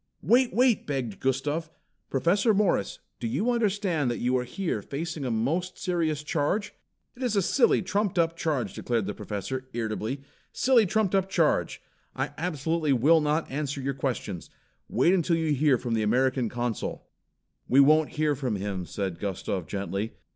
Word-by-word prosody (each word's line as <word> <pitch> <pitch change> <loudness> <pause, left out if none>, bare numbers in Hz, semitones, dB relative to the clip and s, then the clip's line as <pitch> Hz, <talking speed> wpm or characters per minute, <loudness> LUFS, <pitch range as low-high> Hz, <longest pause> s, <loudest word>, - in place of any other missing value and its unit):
"Wait, 245 +1 +4
wait!" 245 -2 +2
begged 130 -8 -3
Gustav. 145 +5 -1 0.4
"Professor 195 - +2
Morris, 195 - +1 0.2
do 115 - -2
you 170 - 0
understand 200 - +1
that 120 - -2
you 125 +1 0
are 125 -1 0
here 145 - -3
facing 155 +5 -5
a 130 - -1
most 155 +12 -1
serious 160 -5 -1
charge?" 170 +8 -1 0.4
"It 250 - -13
is 245 -4 0
a 200 - +4
silly, 235 +3 +3
trumped 195 0 -1
up 165 -1 +2
charge," 140 -11 -1
declared 115 -4 -1
the 105 - -3
Professor, 130 +7 -5
irritably. 115 +3 -3 0.3
"Silly 250 -5 +4
trumped 210 0 +1
up 195 -1 +2
charge! 165 -5 +1 0.3
I - - -2
absolutely 160 -2 0
will 155 +6 +5
not 150 +1 0
answer 145 0 -3
your 135 +1 -2
questions. 130 -9 -4 0.4
Wait 175 - +3
until 175 -2 +2
you 160 -2 +1
hear 145 -1 +3
from 120 -1 -3
the 110 - +1
American 125 +2 +1
Consul." 120 -1 -3 0.6
"We 135 - +4
won't 155 +2 +5
hear 150 -1 +1
from 130 -5 -2
him," 95 -3 -4
said 95 -4 -4
Gustav 95 -3 -3
gently. 100 +4 -3
145 Hz, 165 wpm, -27 LUFS, 120-175 Hz, 0.6 s, will